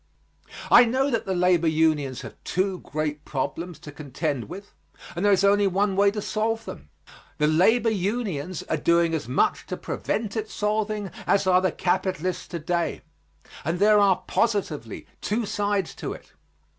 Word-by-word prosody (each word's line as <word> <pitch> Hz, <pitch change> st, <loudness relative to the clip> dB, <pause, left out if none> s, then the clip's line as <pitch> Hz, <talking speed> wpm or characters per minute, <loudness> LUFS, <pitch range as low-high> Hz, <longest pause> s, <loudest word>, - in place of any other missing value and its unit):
I 245 Hz, -, +9 dB
know 265 Hz, +4 st, +1 dB
that 230 Hz, -4 st, -1 dB
the 190 Hz, -, 0 dB
labor 175 Hz, -2 st, +3 dB
unions 155 Hz, -4 st, +1 dB
have -, -, -9 dB
two 185 Hz, 0 st, -1 dB
great 150 Hz, 0 st, -4 dB
problems 160 Hz, +5 st, -4 dB
to 145 Hz, -, -9 dB
contend 145 Hz, -2 st, -4 dB
with, 200 Hz, +3 st, -9 dB, 0.4 s
and 175 Hz, -, -3 dB
there 205 Hz, -, +4 dB
is 195 Hz, 0 st, +3 dB
only 200 Hz, 0 st, +4 dB
one 195 Hz, +1 st, +1 dB
way 200 Hz, +1 st, +5 dB
to 210 Hz, 0 st, -4 dB
solve 225 Hz, +1 st, -1 dB
them. 75 Hz, +1 st, -9 dB, 0.5 s
The 150 Hz, -, +2 dB
labor 220 Hz, +10 st, +3 dB
unions 190 Hz, -5 st, -2 dB
are 160 Hz, -, -2 dB
doing 170 Hz, +2 st, +2 dB
as 155 Hz, -8 st, -2 dB
much 125 Hz, -, +1 dB
to -, -, -4 dB
prevent 215 Hz, -2 st, -3 dB
its 220 Hz, -1 st, -4 dB
solving 210 Hz, -2 st, -1 dB, 0.2 s
as 200 Hz, 0 st, +3 dB
are 185 Hz, -1 st, +4 dB
the 185 Hz, -2 st, +1 dB
capitalists 185 Hz, 0 st, -1 dB
to 175 Hz, -, -5 dB
day, 170 Hz, +2 st, -2 dB, 0.6 s
and 165 Hz, +4 st, -1 dB
there 210 Hz, +2 st, +5 dB
are 190 Hz, -2 st, +3 dB
positively 165 Hz, -, -1 dB, 0.2 s
two 220 Hz, +2 st, -1 dB
sides 205 Hz, -3 st, -1 dB
to -, -, -5 dB
it. -, -, -14 dB
185 Hz, 170 wpm, -25 LUFS, 160-205 Hz, 0.6 s, I